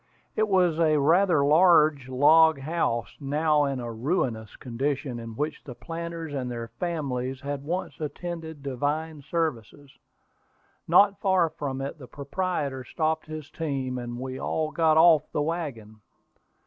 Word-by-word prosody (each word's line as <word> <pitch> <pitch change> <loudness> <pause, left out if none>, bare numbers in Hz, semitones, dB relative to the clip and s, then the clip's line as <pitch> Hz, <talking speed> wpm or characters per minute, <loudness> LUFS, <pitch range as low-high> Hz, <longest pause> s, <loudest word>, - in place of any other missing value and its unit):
It 215 - +2
was 180 -5 +2
a 155 -2 +4
rather 165 +1 +4
large 155 -4 +4
log 155 +4 +5
house, 135 -6 -1
now 150 +1 +2
in 135 -2 -2
a 120 -1 -5
ruinous 115 - -2
condition, 130 +1 -3
in 115 -1 -8
which 150 +4 -3
the 125 - -9
planters 165 -1 -6
and 130 -3 -3
their 115 -1 -5
families 135 -7 -3
had 140 0 -4
once 175 +5 -4
attended 160 -1 -6
divine 145 +3 -2
services. 145 -3 -3 1.0
Not 200 +4 +5
far 185 -4 +2
from 135 -2 -4
it 140 +3 -5
the 130 - -10
proprietor 140 -2 -3
stopped 160 +3 -2
his 155 -1 -8
team, 135 -5 -3
and 120 0 -6
we 130 0 -5
all 155 -1 -2
got 160 -1 +3
off 160 -2 +5
the - - -1
wagon. 135 -10 -5
150 Hz, 145 wpm, -26 LUFS, 130-165 Hz, 1.0 s, log